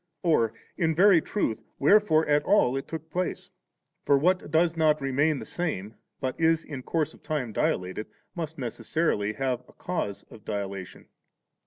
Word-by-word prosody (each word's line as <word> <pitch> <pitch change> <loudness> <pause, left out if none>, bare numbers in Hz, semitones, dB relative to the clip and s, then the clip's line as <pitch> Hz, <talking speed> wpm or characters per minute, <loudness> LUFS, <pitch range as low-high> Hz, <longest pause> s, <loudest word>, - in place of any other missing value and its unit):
or, 135 -10 +3 0.3
in 160 -3 +1
very 185 -1 +6
truth, 115 - -2 0.2
wherefore 160 -1 +4
at 150 0 +4
all 145 -11 +3
it 135 - -4
took 160 -1 -7
place? 180 +2 -3 0.5
for 140 - +4
what 180 +5 +1
does 165 +1 +2
not 155 -2 +3
remain 140 +3 +1
the - - -7
same, 110 - -3 0.3
but 130 -1 -2
is 165 0 +3
in 140 -4 -6
course 155 +3 -1
of - - -18
time 140 -9 -3
dilated, 95 +2 -1 0.3
must 160 -2 -5
necessarily 120 -3 -1
have 125 +1 -1
a - - -19
cause 105 - -4
of 110 - -13
dila 100 -2 -3
tation. 95 -2 -9
150 Hz, 165 wpm, -27 LUFS, 120-165 Hz, 0.5 s, very